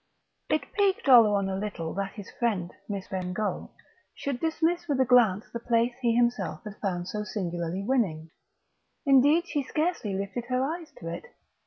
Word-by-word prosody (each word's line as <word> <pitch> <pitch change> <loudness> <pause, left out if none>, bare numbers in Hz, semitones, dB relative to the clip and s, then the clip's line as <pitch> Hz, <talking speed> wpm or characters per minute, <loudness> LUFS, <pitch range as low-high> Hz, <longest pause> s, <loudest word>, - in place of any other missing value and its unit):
III - - +4
It 295 -2 -5
piqued 400 -5 +1
Oleron 210 -6 +6
a 190 - -2
little 190 -5 -4
that 195 +1 -3
his 205 -3 -9
friend, 200 -8 -1 0.2
Miss 200 -2 -4
Bengough, 185 +2 -3 0.5
should 280 -3 -3
dismiss 330 +3 0
with 285 -4 0
a 260 - +5
glance 225 -5 +4
the 235 - -4
place 235 +1 +1
he 235 -2 +2
himself 240 +1 0
had 210 -2 -8
found 180 -3 -2
so 210 +2 -3
singularly 175 -2 -3
winning. 185 -10 0 0.7
Indeed 285 +5 +5
she 290 - -1
scarcely 305 - -1
lifted 200 +5 -3
her 255 +1 0
eyes 325 +3 -4
to 165 - -8
it. 165 - -5
230 Hz, 170 wpm, -28 LUFS, 190-270 Hz, 0.7 s, Oleron